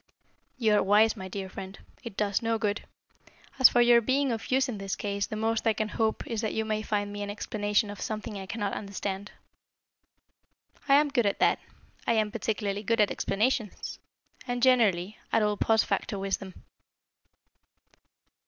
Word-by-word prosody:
"You 220 -4 +2
are 210 - +4
wise, 210 +3 +4
my 190 -3 -7
dear 190 +1 -5
friend. 190 +1 -8 0.3
It 230 -5 -8
does 205 -2 +1
no 230 0 0
good. 210 -1 -2 0.7
As 260 - +9
for 245 - +3
your 240 0 +6
being 265 +3 +1
of 225 -1 -4
use 260 +1 +3
in 225 -5 -5
this 195 -1 -3
case, 200 -1 -2
the - - -5
most 225 +1 0
I 225 - +4
can 215 0 -2
hope 220 0 -1
is 225 -2 -3
that 220 - -2
you 220 - 0
may 215 0 -1
find 205 -1 -2
me 205 - -5
an 205 - -4
explanation 205 0 -1
of 205 - -9
something 215 0 -4
I 195 -1 -6
cannot 205 -1 -3
understand." 200 0 -4 1.6
"I 275 - +7
am 295 +1 +4
good 245 -6 +2
at 200 - 0
that. - - +3 0.5
I - - +4
am 215 -2 +1
particularly 205 -2 -2
good 230 +2 0
at 210 - +4
explanations 215 +1 -1 0.5
and, 245 0 -2
generally, 215 -7 +3
at 225 - +3
all 210 0 +1
post 220 +2 +2
facto 205 - -2
wisdom." 195 -1 -3
215 Hz, 180 wpm, -28 LUFS, 200-230 Hz, 1.6 s, As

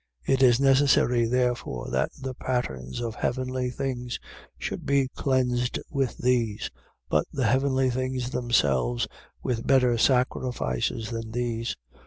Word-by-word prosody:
9:23. - - +3
It 135 - +2
is 125 -2 +6
necessary 135 -3 +4
therefore 125 - -1
that - - +1
the 130 -1 -4
patterns 90 - -3
of 115 -2 -3
heavenly 130 +2 -1
things 125 -1 -3 0.4
should - - -4
be 140 -2 +2
cleansed 125 -2 0
with 135 -3 -1
these: 120 -4 0 0.4
but - - +1
the 135 -3 -1
heavenly 130 +2 +2
things 130 0 -2
themselves 70 - +1 0.4
with 115 -2 -2
better 125 -3 +4
sacrifices 125 - 0
than 115 -1 -4
these. 120 -1 -2
125 Hz, 130 wpm, -26 LUFS, 115-130 Hz, 0.4 s, is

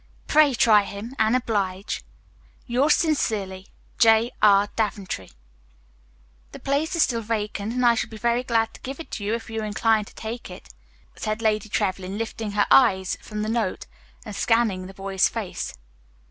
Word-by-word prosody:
Pray 300 -3 +4
try 215 -2 +5
him, 205 +5 -7
and 220 +2 +3
oblige_, 200 -5 -1 0.6
Yours 270 +5 +3
sincerely, 205 - -1 0.3
J. 225 +1 +5
R. 200 -1 +6
Daventry 200 - -3 1.2
"The - - -8
place 290 +5 -1
is 335 - +5
still 230 -2 -1
vacant, 215 -1 -3
and 250 0 +1
I 235 - +6
shall 225 - -2
be 220 - -9
very 235 +2 +1
glad 225 -3 0
to - - -14
give 270 +3 -6
it 330 - -9
to 210 - -5
you, 210 +3 0
if 230 -1 -7
you 225 0 -4
incline 215 0 +1
to - - -16
take 230 0 -6
it," 180 - -11 0.5
said 215 0 -3
Lady 215 -1 +1
Trevlyn, 190 -1 -2
lifting 220 -1 -4
her 205 0 +3
eyes 190 -8 +5
from 210 0 -5
the - - -2
note 225 -4 -1 0.4
and 210 -3 -7
scanning 215 -5 +1
the 190 - -12
boy's 195 -1 +1
face. - - -5
220 Hz, 170 wpm, -24 LUFS, 200-235 Hz, 1.2 s, R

